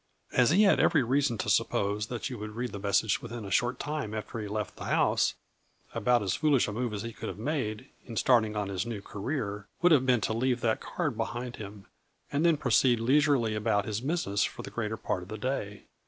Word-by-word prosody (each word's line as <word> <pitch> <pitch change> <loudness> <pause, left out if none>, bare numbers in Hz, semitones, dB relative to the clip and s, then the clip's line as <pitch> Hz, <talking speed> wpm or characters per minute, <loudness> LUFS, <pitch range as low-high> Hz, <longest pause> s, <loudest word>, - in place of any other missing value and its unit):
As 125 -2 +4
he 190 +7 +5
had 200 - +5
every 150 -5 +4
reason 130 -1 +1
to - - -3
suppose 105 +2 +1
that 120 -1 -4
you 125 -5 -6
would 105 0 -7
read 120 +1 -3
the 100 - -6
message 100 +1 +1
within 115 -2 -7
a 100 - -7
short 120 +6 +1
time 145 -8 -3
after 110 +1 -5
he 105 - -4
left 105 0 -4
the - - -7
house, - - +2 0.6
about 120 0 +2
as 95 -1 0
foolish 145 -2 +2
a - - -3
move 120 +1 -2
as 105 0 -4
he 115 0 -5
could - - -6
have - - -7
made, 125 -2 -3 0.2
in 115 - -7
starting 110 -4 +3
on 105 -1 -1
his 95 -1 -1
new 110 -4 -5
career, 105 -3 -4 0.2
would 180 - +6
have 130 -4 +4
been 125 -3 +4
to 110 - 0
leave 125 +1 0
that 110 -1 +1
card - - -2
behind 120 +1 -4
him, 105 -1 -9 0.5
and 145 +2 +1
thfen 170 -2 +4
proceed 125 -2 +3
leisurely 130 -2 +3
about 105 -1 +1
his 110 +1 -3
busi 165 +6 -1
ness 100 0 +2
for - - -4
the - - -8
greater 110 -1 -3
part 90 - -2
of 90 - -11
the 110 - -5
day. 105 -4 -3
115 Hz, 230 wpm, -29 LUFS, 105-130 Hz, 0.6 s, would